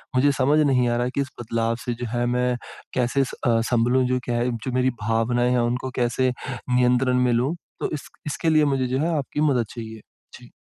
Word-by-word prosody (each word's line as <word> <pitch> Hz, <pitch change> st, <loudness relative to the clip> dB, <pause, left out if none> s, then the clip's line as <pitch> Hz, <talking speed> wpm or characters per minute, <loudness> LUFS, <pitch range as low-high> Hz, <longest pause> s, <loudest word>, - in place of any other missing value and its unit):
मुझे 140 Hz, +3 st, +4 dB
समझ 140 Hz, +3 st, +2 dB
नहीं 130 Hz, -4 st, +3 dB
आ 120 Hz, -, +1 dB
रहा 120 Hz, +1 st, 0 dB
है 125 Hz, -, -2 dB
कि 140 Hz, -, +2 dB
इस 135 Hz, -, -3 dB
बदलाव 115 Hz, 0 st, -1 dB
से 120 Hz, -, -1 dB
जो 120 Hz, -, -1 dB
है 120 Hz, 0 st, 0 dB
मैं 125 Hz, 0 st, +1 dB, 0.4 s
कैसे 125 Hz, +2 st, +1 dB
अ, 120 Hz, -3 st, 0 dB
सँभलूँ 125 Hz, +2 st, +3 dB
जो 125 Hz, 0 st, +1 dB
क्या 120 Hz, -, -2 dB
है? 120 Hz, +1 st, +1 dB
जो 115 Hz, +2 st, -4 dB
मेरी 130 Hz, +1 st, +2 dB
भावनाएँ 115 Hz, +3 st, +1 dB
हैं 125 Hz, -, +2 dB
उनको 125 Hz, +2 st, -1 dB
कैसे 125 Hz, +1 st, +1 dB, 0.2 s
नियंत्रण 125 Hz, 0 st, +1 dB
में 125 Hz, -, +2 dB
लूँ, 130 Hz, +8 st, +1 dB, 0.2 s
तो -, -, -1 dB
इस 145 Hz, -, -6 dB, 0.2 s
इसके 160 Hz, +2 st, -1 dB
लिए 155 Hz, -1 st, +4 dB
मुझे 130 Hz, -1 st, 0 dB
जो 130 Hz, +2 st, -1 dB
है 165 Hz, +1 st, 0 dB
आपकी 145 Hz, +1 st, -3 dB
मदद 120 Hz, -4 st, +1 dB
चाहिए। 110 Hz, -2 st, -7 dB, 0.4 s
जी। -, -, -15 dB
125 Hz, 220 wpm, -23 LUFS, 120-130 Hz, 0.4 s, मुझे